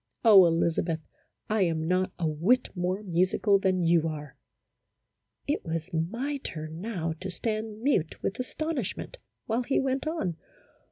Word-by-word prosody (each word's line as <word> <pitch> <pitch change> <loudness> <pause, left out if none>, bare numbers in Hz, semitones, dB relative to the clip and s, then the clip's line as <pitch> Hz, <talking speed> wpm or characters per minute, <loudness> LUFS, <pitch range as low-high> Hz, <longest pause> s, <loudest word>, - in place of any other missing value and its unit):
Oh, 195 -5 +9
Elizabeth, 165 0 +1 0.5
I 215 -1 +1
am 160 -3 +1
not 185 +1 +1
a 170 - 0
whit 180 +12 +2
more 185 +3 -1
musical 185 +2 +2
than 185 -2 +1
you 165 -1 +3
are! 150 -2 -6 0.6
" - - -49
It - - -9
was 165 +1 -4
my 235 - -1
turn 160 - -6
now 180 -7 -2
to 190 - -4
stand 215 +3 -3
mute 195 - +1
with 195 - -2
astonish 275 - -2
ment - - -7 0.3
while 230 +2 0
he 260 +3 +1
went 270 +2 -1
on. 250 - -2
185 Hz, 155 wpm, -28 LUFS, 165-225 Hz, 0.6 s, Oh